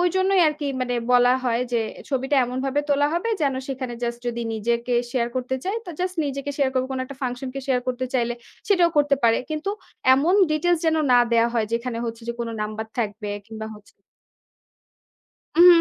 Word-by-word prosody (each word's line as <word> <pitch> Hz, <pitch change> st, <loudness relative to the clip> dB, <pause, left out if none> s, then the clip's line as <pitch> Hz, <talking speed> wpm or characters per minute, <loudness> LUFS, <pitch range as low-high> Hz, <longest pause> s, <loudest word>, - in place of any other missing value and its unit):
ওইজন্যই 375 Hz, +2 st, +3 dB
আরকি 300 Hz, -1 st, -4 dB
মানে 250 Hz, -1 st, -1 dB, 0.2 s
বলা 245 Hz, 0 st, +6 dB
হয় 235 Hz, -1 st, +1 dB
যে, 235 Hz, -, +2 dB, 0.3 s
ছবিটা 270 Hz, +1 st, 0 dB
এমনভাবে 260 Hz, +3 st, -1 dB
তোলা 285 Hz, 0 st, +3 dB
হবে 350 Hz, +7 st, -1 dB
যেন, 275 Hz, -2 st, +2 dB
সেখানে 255 Hz, -2 st, -4 dB
জাস্ট 235 Hz, 0 st, -2 dB
যদি 235 Hz, 0 st, -2 dB
নিজেকে 235 Hz, +3 st, 0 dB, 0.2 s
শেয়ার 235 Hz, -2 st, +1 dB
করতে 255 Hz, +1 st, -1 dB
চায় 395 Hz, +4 st, -1 dB
তো, 355 Hz, -, -7 dB
জাস্ট 365 Hz, 0 st, -2 dB
নিজেকে 275 Hz, +1 st, -3 dB
শেয়ার 275 Hz, -2 st, +2 dB
করবে। 260 Hz, 0 st, 0 dB
কোন 260 Hz, -, -2 dB
একটা 275 Hz, +1 st, -10 dB
ফাংশনকে 255 Hz, +1 st, -3 dB
শেয়ার 260 Hz, -2 st, +2 dB
করতে 255 Hz, 0 st, -1 dB
চাইলে, 240 Hz, -1 st, +1 dB, 0.3 s
সেটাও 360 Hz, -4 st, +4 dB
করতে 290 Hz, -1 st, +4 dB
পারে। 230 Hz, -1 st, +5 dB
কিন্তু 310 Hz, +5 st, -2 dB, 0.4 s
এমন 310 Hz, +8 st, +3 dB, 0.2 s
ডিটেইলস 335 Hz, +3 st, +2 dB
যেন 320 Hz, 0 st, +3 dB, 0.2 s
না 245 Hz, -, +7 dB
দেয়া 230 Hz, 0 st, +4 dB
হয় 225 Hz, -2 st, +1 dB
যেখানে 235 Hz, 0 st, -2 dB
হচ্ছে 230 Hz, 0 st, -5 dB
যে, -, -, 0 dB
কোন 235 Hz, -, -2 dB
নাম্বার 215 Hz, +1 st, -4 dB
থাকবে 210 Hz, -2 st, -2 dB, 0.2 s
কিংবা 220 Hz, 0 st, -7 dB
হচ্ছে 210 Hz, -1 st, -18 dB, 1.6 s
হুম, 345 Hz, +2 st, +8 dB
255 Hz, 180 wpm, -23 LUFS, 235-295 Hz, 1.6 s, হুম